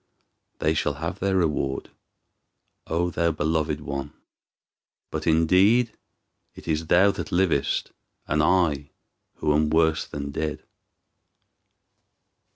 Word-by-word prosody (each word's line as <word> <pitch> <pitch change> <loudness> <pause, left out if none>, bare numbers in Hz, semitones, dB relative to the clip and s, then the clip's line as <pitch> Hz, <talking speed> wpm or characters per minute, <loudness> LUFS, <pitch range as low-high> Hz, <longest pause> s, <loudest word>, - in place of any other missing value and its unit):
They 75 +1 +1
shall 80 - -1
have - - -5
their 95 0 0
reward, 75 -6 -1 1.0
O 85 +2 0
thou 85 0 +1
beloved 75 -1 -1
one! 70 -1 -5 1.0
But 80 +1 -4
indeed 95 +9 +4 0.6
it - - -13
is 80 0 -1
thou 95 +5 +5
that - - -6
livest, 85 -6 +1 0.3
and 75 +1 +1
I 75 -4 +2 0.5
who 75 - 0
am 75 0 +2
worse 80 0 +2
than 70 0 -5
dead." 75 +1 -3
80 Hz, 110 wpm, -25 LUFS, 75-85 Hz, 1.0 s, thou